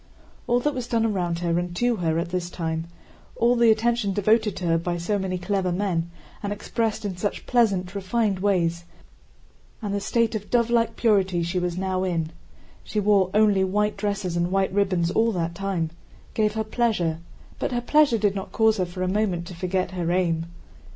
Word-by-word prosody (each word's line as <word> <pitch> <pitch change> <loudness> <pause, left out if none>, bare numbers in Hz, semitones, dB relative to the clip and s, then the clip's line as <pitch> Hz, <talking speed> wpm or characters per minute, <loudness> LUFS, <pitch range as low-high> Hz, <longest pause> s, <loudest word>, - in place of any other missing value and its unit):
All 240 +1 +3
that 295 +3 0
was 250 -3 -4
done 225 -1 +1
around 180 -6 0
her 170 0 +1
and 175 0 -4
to 240 +3 +1
her 165 -2 0
at 170 +1 -2
this 180 -1 -2
time, 160 -2 -3 0.5
all 240 +1 +3
the 235 -1 +5
attention 225 -2 +2
devoted 210 +1 +2
to 180 - -5
her 165 -1 +3
by 175 +1 -2
so 200 +4 -1
many 185 -1 -2
clever 185 0 -1
men 175 -3 -1 0.3
and 205 - -3
expressed 220 +1 -2
in 190 -3 -3
such 205 +3 -3
pleasant, 200 -7 +2
refined 200 0 0
ways, 175 -3 +1 0.9
and 205 -3 -3
the 200 - 0
state 230 +3 +1
of 210 -2 -5
dove 235 -1 +2
like 230 -1 +2
purity 190 -6 +2
she 175 +2 -1
was 180 -1 -2
now 185 0 -1
in 165 -4 -1 0.5
(she 215 - -2
wore 200 -2 +3
only 210 -3 +4
white 210 +2 +1
dresses 200 -3 -2
and 175 0 +1
white 195 -1 +1
ribbons 185 -4 +1
all 230 +3 +2
that 170 -2 -2
time) 185 -4 -2 0.4
gave 215 -1 +1
her 220 - 0
pleasure, 215 -8 0 0.4
but - - -1
her 245 - 0
pleasure 290 -1 +4
did 205 -2 +1
not 195 -1 -5
cause 220 -1 +3
her 185 -2 0
for 180 +1 -5
a - - 0
moment 185 -3 0
to 180 - -8
forget 185 +1 -1
her 175 -2 -2
aim. 170 -2 +1
195 Hz, 200 wpm, -24 LUFS, 175-220 Hz, 0.9 s, the